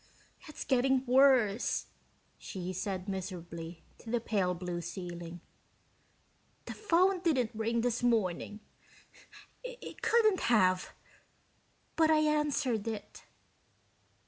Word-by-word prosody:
"It's 305 - -7
getting 265 0 +2
worse," 250 -5 +3 0.5
she 185 -2 -6
said 185 0 -4
miserably 170 -3 -6 0.2
to 230 - -11
the 240 +1 +1
pale 195 -5 0
blue 175 0 -4
ceiling. 175 -2 -7 1.2
"The - - -6
phone 375 -2 +2
didn't 275 -10 +1
ring 225 +1 0
this 240 0 0
morning 210 -3 0 1.0
it - - -9
couldn't 435 -4 +3
have 185 -6 +2 1.0
but 320 -1 +4
I 315 - +5
answered 295 -7 0
it." 210 -2 -5
Dr. - - -15
225 Hz, 105 wpm, -31 LUFS, 185-275 Hz, 1.2 s, I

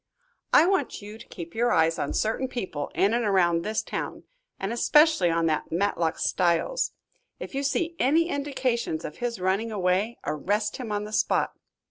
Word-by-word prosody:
"I - - +7
want 375 - 0
you 210 +2 -9
to - - -13
keep 170 -1 -9
your 240 +2 +1
eyes 165 0 +3
on 140 - -1
certain 225 +4 0
people 185 - -4
in 200 +3 +3
and 240 0 +1
around 175 -5 +3
this 215 +4 -2
town, - - -5 0.4
and 195 +4 -2
especially 300 - +4
on 165 0 +1
that 155 -1 -1
Matlock 170 -2 0
Styles. 185 - +1 0.5
If - - -7
you 275 - -1
see 330 +4 -1
any 315 +6 +3
indications 265 - -2
of 150 - -7
his 240 -3 -3
running 195 +5 0
away, 195 +3 0
arrest 205 +9 -1
him 240 -5 -6
on 205 0 -1
the 210 +1 -8
spot. 210 - +1
210 Hz, 175 wpm, -26 LUFS, 175-245 Hz, 0.5 s, I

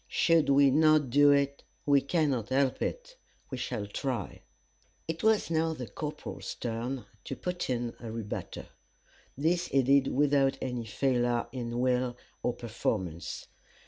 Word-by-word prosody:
Should 165 -4 +3
we 140 0 +6
not 155 -2 +4
do 145 +2 +6
it, 140 0 +2 0.2
we 140 -1 +5
cannot 140 - 0
help 135 0 +1
it. - - -4 0.3
We 130 - -4
shall 110 -4 -3
try." 125 +5 -4 0.7
It 165 0 -3
was 220 -5 +2
now 160 0 +1
the 125 -4 -6
corporal's 150 +8 -6
turn 120 +1 -4 0.2
to - - -4
put 180 -4 -4
in 120 -2 -1
a 115 -2 -7
rebutter. 110 -2 -6 0.7
This 170 +5 +1
he 135 -1 +2
did 135 +1 +4
without 140 -1 +2
any 125 -3 -3
failure 120 0 +1
in 120 -2 -4
will 125 -1 +1 0.2
or 125 - 0
performance. 95 -8 -3
135 Hz, 145 wpm, -30 LUFS, 120-145 Hz, 0.7 s, we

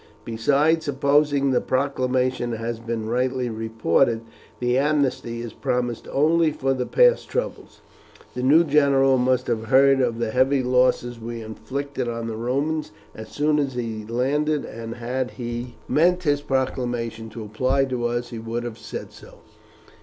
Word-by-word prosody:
Besides, 145 +8 +2
supposing 140 0 +2
the 125 - +2
proclamation 130 -2 0
has 115 +1 -4
been 115 -1 -4
rightly 125 +1 0
reported, 115 +1 +1 0.4
the 125 0 +1
amnesty 135 -4 0
is 115 -2 -7
promised 120 -2 -2
only 160 +3 +3
for 135 -2 0
the 125 -1 -3
past - - +3
troubles. - - -4 0.5
The 125 - -4
new 145 +6 +5
general 140 -3 +3
must 125 0 +2
have 110 -2 -2
heard 135 +2 +5
of 120 -2 0
the 115 -2 -2
heavy 130 +2 +2
losses 125 -1 +2
we 115 0 -6
inflicted 130 +5 -5
on 115 -1 -3
the 115 -1 -4
Romans 140 +7 -1 0.2
as 110 - -9
soon 150 +1 +1
as 135 -3 -1
he 115 -3 -4
landed, 140 +7 0
and 115 0 -7
had 125 +2 -3
he 120 0 -5
meant 180 +3 +3
his 145 -3 +1
proclamation 120 -4 -2
to 110 +1 -8
apply 130 +6 +1
to 125 -2 -2
us 120 0 -3
he 115 - -5
would 115 +1 -4
have 115 -2 -6
said - - -7
so. - - -15
125 Hz, 155 wpm, -23 LUFS, 115-140 Hz, 0.5 s, new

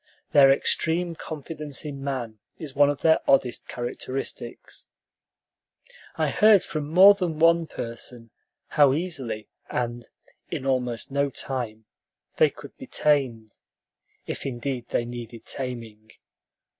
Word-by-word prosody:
Their 135 -2 +7
extreme 165 +5 +1
confidence 155 -2 -5
in 140 -2 -6
man 120 -6 -4 0.2
is 150 -5 -8
one 145 0 +5
of 145 - -3
their 160 -1 +5
oddest 130 -3 +2
characteristics. 130 +2 -5 1.3
I - - +1
heard 210 -3 +6
from 150 -2 -4
more 190 +5 +8
than 180 -6 -3
one 165 +1 +4
person 115 -2 -8 0.4
how 145 -3 +5
easily 135 - -4 0.2
and 120 -1 -3 0.4
"in 130 - -4
almost 125 -2 -1
no 140 +1 +1
time" 120 -4 -5 0.5
they - - +5
could - - -13
be - - -9
tamed, 125 -7 0 0.7
if - - -5
indeed 125 -1 -4
they 120 - -1
needed 120 -1 -8
taming. 115 -5 -6
135 Hz, 120 wpm, -25 LUFS, 120-150 Hz, 1.3 s, more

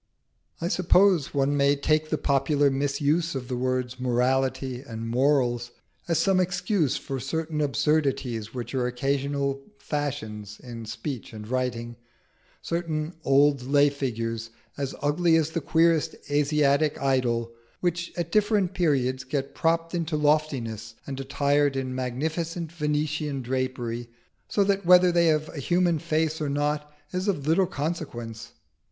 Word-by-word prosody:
I 170 - -1
suppose 180 -3 +3
one 140 +1 +1
may 140 0 +4
take 155 +2 +1
the 155 - 0
popular 140 0 +2
misuse 145 +4 0
of 125 -2 -4
the 125 - -1
words 125 0 -1
Morality 130 +1 0
and 115 -4 -6
Morals 120 -1 +2 0.4
as 165 -2 +1
some 185 +4 +3
excuse 180 - +1
for 135 -1 -5
certain 155 +3 -2
absurdities 135 -6 0
which 125 +1 -6
are 125 -2 +1
occasional 140 +2 -1 0.2
fashions 110 -9 -4
in 115 -2 -8
speech 120 +2 -5
and 105 -1 -8
writing 120 -2 -2 0.7
certain 165 -1 -2
old 140 0 +4
lay 145 +3 +3
figures, 115 -4 -3 0.3
as 140 -1 -3
ugly 165 +3 +3
as 160 -1 +2
the 165 - -2
queerest 165 +1 +2 0.2
Asiatic 145 0 +2
idol, 120 -4 +1 0.3
which 175 -1 -1
at 170 -1 -2
different 205 -2 +2
periods 130 -7 +1
get 135 +1 -3
propped 165 +1 0
into 165 -2 -1
loftiness, 130 -8 0
and 135 -1 -5
attired 140 +1 +1
in 130 -1 -2
magnificent 160 +6 -3
Venetian 150 -3 -1
drapery, 120 -2 -3 0.4
so 205 - +2
that 200 0 +1
whether 180 +1 +6
they 170 -1 +3
have 155 -1 +2
a 150 - -7
human 175 +2 +2
face 160 -1 0
or 150 - -1
not 150 +1 -1 0.2
is 185 +2 -2
of 160 -9 0
little 170 +4 +3
consequence. 120 -9 -5
145 Hz, 140 wpm, -26 LUFS, 130-160 Hz, 0.7 s, whether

